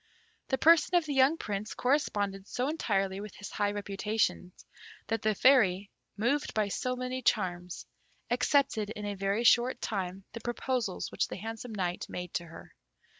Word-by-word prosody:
The 265 - 0
person 335 +4 +5
of 345 -2 +4
the 295 - -2
young 270 +4 +4
Prince 205 -3 -4
corresponded 205 -8 0
so 250 +2 -1
entirely 195 -11 0
with 210 -2 -9
his 205 - -8
high 205 0 0
reputation, 205 -1 -1 0.5
that 225 +2 -2
the 215 -1 +1
Fairy, 200 -7 +4 0.3
moved 260 +8 0
by 215 -2 +1
so 255 +5 -2
many 255 +1 -3
charms, 180 -6 -1 0.5
accepted 245 -4 +2
in 210 -1 -6
a 205 - -2
very 200 +3 -1
short 240 +2 +4
time 190 -2 -3
the 230 - -7
proposals 240 -3 -2
which - - 0
the - - -6
handsome 225 +2 -6
Knight 180 -3 -2
made 180 -1 -6
to 175 - -2
her. 165 - -12
215 Hz, 165 wpm, -30 LUFS, 195-250 Hz, 0.5 s, person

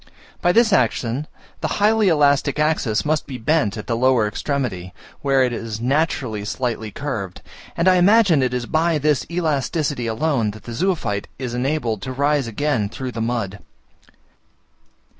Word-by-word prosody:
By 175 - +3
this 225 +1 +4
action, 125 +3 +1 0.3
the 160 - -1
highly 215 0 +3
elastic 145 -3 +3
axis 150 -8 +1
must 155 +1 0
be 130 - -6
bent 120 -3 +1
at 110 - -6
the 115 - -1
lower 125 -2 +3
extremity, 105 -7 -3 0.3
where 135 -2 +3
it 125 -1 0
is 115 -2 -5
naturally 125 -5 0
slightly 110 0 -3
curved; 105 -8 -5 0.3
and 170 - +1
I 185 0 +6
imagine 190 -4 +5
it 130 -1 +1
is 125 -1 -2
by 160 +5 +1
this 150 -2 +1
elasticity 150 -5 -1
alone 115 0 0
that 105 - -17
the 120 - -7
zoophyte 155 - -1
is 125 -2 -4
enabled 125 -4 -1
to 130 +5 -5
rise 140 0 +1
again 115 -2 -1
through 125 +3 -5
the 115 - -5
mud. 110 -4 -2
130 Hz, 160 wpm, -21 LUFS, 115-155 Hz, 0.3 s, I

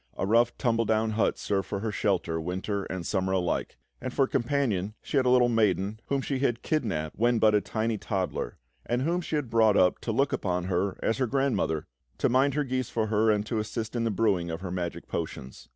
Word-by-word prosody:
A - - 0
rough, 115 +3 +3
tumble 115 -2 +1
down 110 +1 +1
hut 110 0 +1
served 95 -1 -2
her 100 - -2
for 110 +1 -2
shelter, 90 -6 0
winter 95 +4 -3
and 95 -2 -5
summer 95 0 0
alike; 90 -2 -1 0.2
and 130 - -3
for 135 +1 +3
companion 115 -7 0
she - - -3
had 130 -2 +3
a - - +5
little 125 -1 +5
maiden 105 -2 +1
whom 140 -1 0
she 135 0 -2
had 120 -4 0
kidnapped 100 - -2
when 120 +1 +3
but 110 -1 +4
a 105 - +4
tiny 110 0 -2
toddler, 95 - -3 0.3
and 120 +2 -1
whom 170 +4 0
she 160 - -3
had 140 -6 -2
brought 110 -3 +4
up 90 -1 +4
to 115 - -3
look 135 +5 +1
upon 90 -2 -1
her 95 +1 -1
as 115 - 0
her 130 - +2
grandmother, 120 - 0 0.3
to - - +2
mind 130 +2 +3
her 150 - +2
geese 130 -2 -2
for 110 -1 0
her 110 +1 +3
and 105 -1 +2
to 110 0 -1
assist 110 +2 -4
in 115 - 0
the 115 - +1
brewing 100 -5 +1
of 80 +1 -4
her 95 -2 -5
magic 90 -1 -4
potions. 65 0 -6
110 Hz, 225 wpm, -28 LUFS, 95-120 Hz, 0.3 s, a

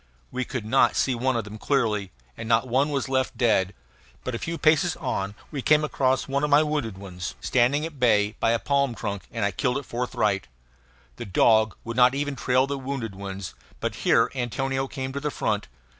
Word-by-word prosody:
We 130 0 -2
could 125 -5 -4
not 130 +5 +3
see 130 - +2
one 130 +2 0
of 115 - -1
them 105 +1 -9
clearly; 110 -9 0 0.3
and 110 - -7
not 115 +2 +3
one 135 +4 +2
was 140 -2 -1
left 130 -1 0
dead. 105 -6 +2 0.5
But 130 - -3
a 115 - -3
few 170 0 -3
paces 160 +2 +3
on 100 - -3 0.2
we 145 -4 -3
came 150 +3 +4
across 130 -3 +1
one 140 +1 -1
of 150 - +1
my 145 +2 +6
wounded 145 -10 -2
ones, 90 -3 -6
standing 130 +5 +2
at 160 -4 -8
bay 105 -3 +3
by - - +2
a 115 - +3
palm 140 +3 0
trunk; 100 -4 -5
and 115 -3 -1
I 100 - +1
killed 125 +5 0
it 140 - -5
forthwith. 110 -5 -1 0.7
The - - -6
dog 110 +3 +3
would 115 +1 -5
not 125 +1 +6
even 145 0 -2
trail 130 0 +2
the 140 0 -3
wounded 130 -5 -4
ones; 95 -1 -6 0.3
but - - -3
here - - +4
Antonio 135 +1 -2
came 130 -1 -5
to 140 - -2
the 150 +1 -2
front. 105 -6 -1
125 Hz, 205 wpm, -25 LUFS, 110-140 Hz, 0.7 s, my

